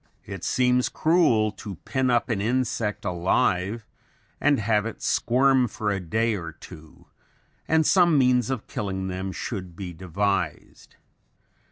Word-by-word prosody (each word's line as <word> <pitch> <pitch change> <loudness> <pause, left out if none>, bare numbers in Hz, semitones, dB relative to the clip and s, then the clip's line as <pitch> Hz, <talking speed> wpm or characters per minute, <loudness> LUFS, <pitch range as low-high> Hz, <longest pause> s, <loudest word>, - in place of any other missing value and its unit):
It - - -8
seems 125 0 +2
cruel 150 -11 +2
to 100 -2 -8
pin 130 -1 0
up 120 +2 +1
an 110 -4 -1
insect 110 -3 -1
alive 95 +3 0 0.5
and 145 -3 +3
have 105 0 +1
it 115 - -8
squirm 130 +1 +3
for 105 -1 -3
a 100 - -1
day 110 +6 0
or 85 -4 -6
two 80 -1 -14 0.6
and 160 0 +3
some 175 -3 +4
means 125 -3 +3
of 130 -5 -3
killing 95 -2 -4
them 95 +1 -4
should 95 -3 -6
be 90 -1 -7
devised. 95 -1 -3
110 Hz, 140 wpm, -25 LUFS, 95-125 Hz, 0.6 s, some